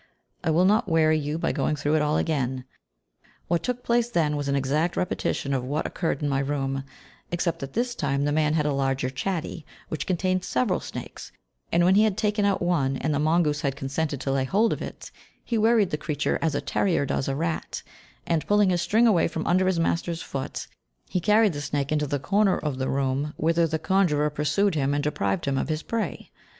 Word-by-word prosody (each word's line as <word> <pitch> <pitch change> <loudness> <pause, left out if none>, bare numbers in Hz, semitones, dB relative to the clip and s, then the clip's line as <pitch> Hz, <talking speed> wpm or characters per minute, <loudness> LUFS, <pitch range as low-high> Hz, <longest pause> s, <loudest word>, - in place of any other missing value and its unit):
I 170 - 0
will 165 +3 +4
not 205 0 +3
weary 155 -1 +3
you 150 +1 -2
by - - 0
going 150 +1 0
through 145 +1 0
it 155 - +3
all 150 +1 +1
again. 130 -5 -1 0.8
What 170 0 +1
took 250 0 -3
place 240 0 +1
then 160 -9 +1
was 145 -1 -3
an 140 - +1
exact 150 +6 0
repetition 140 -5 -1
of 130 -2 0
what 145 +5 -2
occurred 160 -4 -2
in - - +1
my 135 -1 +1
room, 135 -1 -2 0.5
except 175 -1 -1
that 135 0 -7
this 240 +2 0
time 140 - -1
the 145 - +1
man 155 0 +2
had 150 -2 +1
a 150 - +1
larger 135 -1 0
chatty, 165 +3 -3 0.3
which 155 -3 -4
contained 185 0 0
several 205 -3 0
snakes, - - -8 0.4
and 170 +1 +3
when 185 - +5
he 210 +2 +5
had 215 -3 +1
taken 210 -1 +1
out 200 -3 +1
one, 140 -7 +1
and 155 - -1
the 145 - 0
mongoose 155 -1 +2
had 140 -4 -1
consented 140 +1 -2
to 135 - -1
lay 135 -1 +1
hold 205 - +2
of - - -6
it, - - -8 0.3
he 235 - -2
worried 220 -3 +3
the 150 - 0
creature 150 -1 -1
as 160 -3 0
a - - 0
terrier 175 -7 +1
does 135 - -1
a 135 - -1
rat, 165 +2 -3 0.4
and, 165 -2 0
pulling 205 -2 +4
his 175 -1 +1
string 220 +6 +3
away 210 -7 +4
from 160 -1 -4
under 185 +2 +3
his 185 -3 +1
master's 165 0 -1
foot, 135 -1 -5 0.4
he 180 - 0
carried 210 +1 +4
the 145 - -4
snake 145 0 -2
into 150 -1 +1
the 145 +1 -1
corner 200 +7 +2
of 145 -4 -3
the 130 - -1
room, 140 +2 -1
whither 165 +1 +2
the 160 0 -1
conjurer 160 -3 +2
pursued 150 +7 +1
him 145 -2 0
and 145 - -1
deprived 100 -10 -1
him 135 -1 0
of - - -3
his 155 0 -2
prey. 230 -1 -3
155 Hz, 220 wpm, -25 LUFS, 140-185 Hz, 0.8 s, when